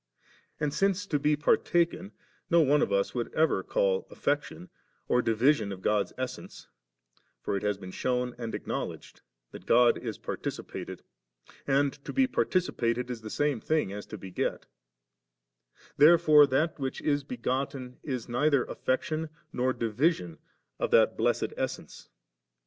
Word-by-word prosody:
And 150 -1 -1
since 195 0 +1
to 150 -7 0
be 150 +1 +2
partaken 170 +5 +1 0.4
no 170 - +5
one 150 0 +3
of - - 0
us 100 0 +1
would 120 -2 -3
ever 160 +1 +2
call - - 0
afifection 145 +5 -2 0.4
or 125 - +3
divi 115 +5 +4
sion 110 -8 -4
of 95 -1 -8
God's 105 -1 +1
essence 130 0 -6 0.8
(for - - -1
it 100 - -2
has 105 -1 0
been 95 -2 -9
shewn 125 +3 -1
and 115 -2 -4
acknowledged - - -5 0.3
that - - -11
God 120 0 +5
b - - -3
participated, - - -6 0.6
and 140 0 +2
to - - -6
be 265 -1 +3
participated 125 - 0
is 120 -2 -6
the 110 - -7
same 145 0 0
thing 155 -11 0
as 105 0 -7
to 110 - -7
beget); 95 -2 -3 1.3
therefore 155 -2 +7
that 150 +4 0
which 135 -1 -3
is 145 -1 0
begotten 130 - -4
is 130 -5 -4
neither 135 +2 +2
afifection 155 +5 -2 0.2
nor 130 +1 +1
division 115 - 0 0.4
of - - 0
that - - +4
blessed - - 0
essence. - - -5
135 Hz, 145 wpm, -29 LUFS, 115-155 Hz, 1.3 s, therefore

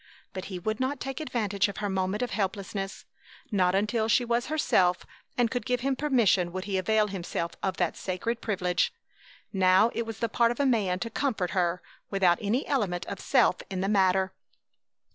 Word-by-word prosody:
But 185 - -5
he 190 -2 -5
would 215 +5 -2
not 260 +2 -1
take 270 0 -4
advantage 215 -9 0
of 200 - -7
her 210 - -2
moment 190 +3 -1
of 245 - -3
helplessness. 195 0 -3 0.5
Not 185 -3 +2
until 215 +3 +1
she 240 +2 +3
was 235 0 0
herself 185 - +2 0.3
and 240 -2 +2
could 245 -3 -2
give 250 +1 -1
him 270 +1 +1
permission 235 -11 +2
would 185 +1 -4
he 195 -1 -1
avail 215 +3 +2
himself 175 -4 -3
of 190 -1 -1
that 175 -3 0
sacred 210 +5 -3
privilege. 180 -4 0 0.6
Now 190 +4 +4
it 230 -1 -2
was 225 -2 -5
the 230 - 0
part 235 +1 +3
of 240 - -3
a 285 - +3
man 210 -8 +2
to 230 - -3
comfort 220 -9 -1
her 180 -1 0 0.3
without 185 -3 +3
any 220 +6 0
element 195 -11 -1
of - - -6
self - - +3
in 190 -2 -3
the 195 - 0
matter. 190 -2 +3
205 Hz, 190 wpm, -28 LUFS, 185-235 Hz, 0.6 s, Now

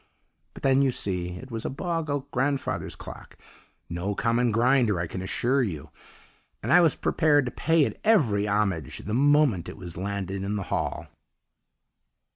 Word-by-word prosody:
But - - -12
then, 135 0 +4
you 135 - +3
see, 90 -7 -2
it 130 +8 -10
was 115 -1 -4
a - - -2
bog 165 +2 -3
oak 145 0 -3
grandfather's 140 0 -1
clock - - -11 0.5
no 90 +4 -3
common 115 +3 +1
grinder 120 -3 +3
I 85 - -1
can 90 +3 -6
assure 125 +8 +1
you; 85 - -4 0.7
and - - +1
I 180 - +8
was 165 -3 +3
prepared 145 -4 +2
to 125 - -3
pay 160 -1 +2
it - - -6
every 120 - +3
homage 100 -8 -1
the 105 - -3
moment 140 - +3
it - - -9
was 90 -3 -6
landed 95 0 -3
in 100 +2 -2
the 100 - -2
hall. - - -2
115 Hz, 170 wpm, -26 LUFS, 95-140 Hz, 0.7 s, I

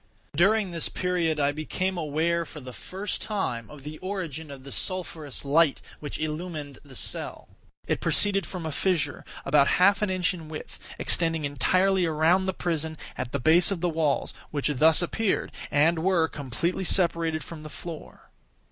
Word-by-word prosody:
During 195 +4 +3
this 165 -2 0
period, 175 -4 0
I 140 0 +3
became 185 +5 -2
aware, 170 +1 0
for 160 - -10
the 130 -2 -9
first 190 - -4
time, 125 - -2
of 145 -2 -12
the 150 +1 -7
origin 170 -6 -4
of 135 -2 -10
the 140 - -9
sulphurous 160 -7 -2
light 150 +1 +4 0.2
which 145 - -5
illumined 155 -2 -4
the 140 -3 -13
cell. - - -3 0.4
It - - 0
proceeded 195 -4 +3
from 180 -3 -6
a 160 - -2
fissure, 155 -3 0 0.2
about 140 0 +4
half 200 +3 +5
an 210 - +1
inch 185 0 +1
in 160 -3 -9
width, 155 - -8 0.2
extending 165 -3 +3
entirely 185 +6 +2
around 165 +4 +3
the - - +2
prison 160 -3 -2 0.2
at 130 -1 -4
the 140 - -1
base 165 +6 +5
of 195 -3 -1
the 175 - +1
walls, 155 -3 0 0.2
which 145 -1 -1
thus 160 +5 +5
appeared, 210 +3 0 0.2
and 160 +3 +3
were, 170 -1 +3
completely 150 +8 -2
separated 165 -4 +2
from 160 +3 -9
the 155 - -8
floor. 165 0 -9
160 Hz, 170 wpm, -27 LUFS, 150-180 Hz, 0.4 s, half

